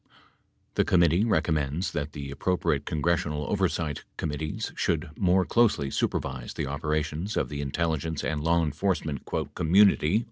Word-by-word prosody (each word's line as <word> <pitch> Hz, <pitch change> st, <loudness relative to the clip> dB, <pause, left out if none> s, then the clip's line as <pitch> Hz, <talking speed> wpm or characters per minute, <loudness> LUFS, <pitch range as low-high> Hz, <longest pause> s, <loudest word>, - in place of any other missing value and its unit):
The -, -, +3 dB
committee 85 Hz, +3 st, +3 dB
recommends 80 Hz, -5 st, 0 dB
that 75 Hz, -2 st, -3 dB
the 70 Hz, -1 st, -6 dB
appropriate 85 Hz, +4 st, 0 dB
congres 85 Hz, +3 st, +1 dB
sional 75 Hz, -1 st, -3 dB
oversight 85 Hz, -7 st, -1 dB
committees 75 Hz, 0 st, -3 dB
should -, -, -1 dB
more 95 Hz, -1 st, +3 dB
closely 105 Hz, -, +2 dB
supervise 65 Hz, -3 st, -2 dB
the 75 Hz, -, -2 dB
operations 75 Hz, +6 st, -2 dB
of -, -, 0 dB
the 70 Hz, -1 st, -4 dB
intelligence 80 Hz, +1 st, -1 dB
and 75 Hz, -1 st, -1 dB
law 85 Hz, +2 st, +2 dB
enforcement 80 Hz, -2 st, -2 dB, 0.3 s
"community." 95 Hz, +1 st, +4 dB
80 Hz, 135 wpm, -27 LUFS, 75-90 Hz, 0.3 s, community